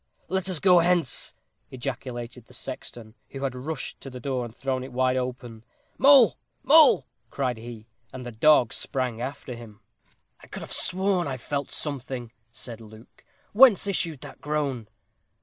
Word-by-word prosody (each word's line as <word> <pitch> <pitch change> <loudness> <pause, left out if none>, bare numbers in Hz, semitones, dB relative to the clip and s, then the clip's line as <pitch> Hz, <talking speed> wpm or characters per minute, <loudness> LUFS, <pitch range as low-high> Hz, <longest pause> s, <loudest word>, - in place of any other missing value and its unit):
"Let 190 0 -1
us 180 -4 0
go 180 0 +6
hence," 170 -5 +1 0.3
ejaculated 125 -2 -6
the 125 - -13
sexton, 120 -4 -8 0.2
who 135 0 -7
had 135 -2 -1
rushed 135 +2 -6
to 135 - -8
the 125 -1 -9
door, 130 0 -2
and 115 -1 -11
thrown 130 -1 -2
it 130 - -9
wide 130 +1 +1
open. 125 -3 -5 0.4
"Mole! 270 -3 +7 0.2
Mole!" 290 - +6 0.2
cried 125 -4 -2
he, 115 -1 -9 0.3
and 125 -1 -8
the 120 - -6
dog 125 +1 +4
sprang 125 -4 -3
after 130 0 -5
him. 115 -3 -11 0.6
"I - - -16
could - - -7
have - - -10
sworn 185 -1 +2
I 130 -2 -3
felt 140 +2 -4
something," 130 -5 -3 0.2
said 115 -2 -10
Luke; 110 +1 -16 0.3
"whence 225 -3 +7
issued 170 -7 -2
that 145 -3 -11
groan?" 145 -6 -2
130 Hz, 160 wpm, -26 LUFS, 120-155 Hz, 0.6 s, Mole